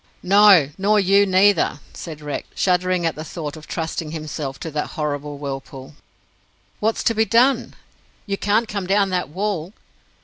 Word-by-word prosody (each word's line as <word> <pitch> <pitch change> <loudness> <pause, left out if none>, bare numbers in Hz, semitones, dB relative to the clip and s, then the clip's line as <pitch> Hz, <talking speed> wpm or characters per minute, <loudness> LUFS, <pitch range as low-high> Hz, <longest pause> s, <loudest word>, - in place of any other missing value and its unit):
"No, 195 -6 +6
nor 210 +2 +3
you 200 +1 +4
neither," 190 -4 +3
said 155 -3 -8
Rex, 145 -1 -5
shuddering 180 -1 +1
at 165 - +1
the 155 - -7
thought 155 -2 -6
of 155 -1 -12
trusting 160 -1 -4
himself 150 -3 -5
to 160 - -5
that 150 0 -2
horrible 145 -1 -3
whirlpool. 135 -1 -7 0.9
"What's 220 +1 0
to 230 - +2
be 220 0 +2
done? 245 +3 +2 0.5
You 200 -1 -2
can't 215 +4 +1
come 200 -4 -4
down 195 0 +2
that 180 -4 -1
wall." 190 0 -3
180 Hz, 160 wpm, -21 LUFS, 150-205 Hz, 0.9 s, No